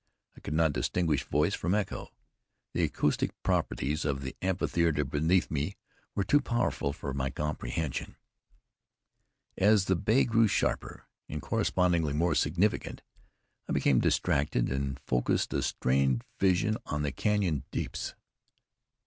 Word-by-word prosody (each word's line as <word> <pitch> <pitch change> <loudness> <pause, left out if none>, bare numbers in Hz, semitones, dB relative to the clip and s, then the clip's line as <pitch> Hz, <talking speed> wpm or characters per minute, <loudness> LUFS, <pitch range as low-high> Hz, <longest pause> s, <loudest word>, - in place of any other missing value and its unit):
I - - -13
could 75 - -4
not 80 -2 +3
distinguish 80 -3 0
voice 75 +7 +1
from 90 +2 0
echo. 105 -2 -3 0.6
The - - 0
acoustic 75 - -1
properties 75 +6 0
of 70 -2 -1
the 65 - -5
amphitheater 85 -4 +1
beneath 80 +6 +1
me 75 +6 -2 0.4
were 100 - +1
too 145 +10 +3
wonderful 120 - 0
for 70 -1 -5
my 70 0 -1
comprehension. 75 0 -3 1.4
As 105 -1 +5
the 95 - +2
bay 110 +8 +3
grew 115 -1 +4
sharper, - - -1 0.2
and 75 - -4
correspondingly 85 -1 +1
more 85 +2 +2
significant, 85 +8 0 0.7
I - - 0
became 65 -3 +3
distracted, 70 -4 +1
and 70 0 -2
focused 60 -1 0
a - - +1
strained 65 -1 +1 0.2
vision 95 +3 +2
on 75 0 -2
the 70 - 0
canyon 90 -7 0
deeps. - - -4
75 Hz, 130 wpm, -30 LUFS, 70-95 Hz, 1.4 s, As